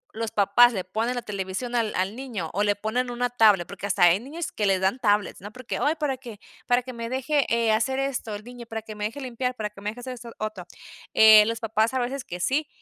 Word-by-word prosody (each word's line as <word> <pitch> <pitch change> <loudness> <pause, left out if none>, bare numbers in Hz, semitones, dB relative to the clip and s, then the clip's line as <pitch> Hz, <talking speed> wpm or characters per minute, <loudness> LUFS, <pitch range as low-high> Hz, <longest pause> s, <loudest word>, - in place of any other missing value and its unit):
los 225 0 -2
papás 210 +5 +5
le 190 - -2
ponen 220 +7 -2
la 245 - -4
televisión 200 +4 -4
al 230 -3 +1
al 190 +3 -1
niño 230 -11 -5
o 200 - 0
le 205 -1 +2
ponen 230 +5 -2
una 245 0 -2
tablet, 210 -7 +4
porque 200 0 -6
hasta 180 - +2
hay 175 +2 +6
niños 305 +8 -6
que 210 -2 -1
les 190 -1 +3
dan 190 +7 0
tablets, 205 -4 +1
¿no? 205 +2 -8
Porque: 250 +1 -5
"Ay, 300 +2 +2
para 295 -5 -2
que, 235 -5 -11 0.3
para 245 0 +3
que 255 0 -8
me 230 0 -5
deje, 270 +3 0
eh, 230 -1 +2
hacer 235 +5 +1
esto 270 -5 -2
el 205 - -8
niño, 245 -1 -10
para 220 -1 -5
que 215 0 -8
me 210 0 -4
deje 235 +7 -5
limpiar, 250 0 -3
para 210 -2 -4
que 200 -1 -14
me 205 - -2
deje 235 +3 -8
hacer 255 +1 -6
esto 240 -1 -10
otro". 215 -4 -5 0.5
Eh, 215 -1 +9
los 230 0 -2
papás 225 +2 0
a 260 - +2
veces 250 +2 -3
que 180 - -7
sí, 290 - 0
230 Hz, 255 wpm, -25 LUFS, 210-250 Hz, 0.5 s, Eh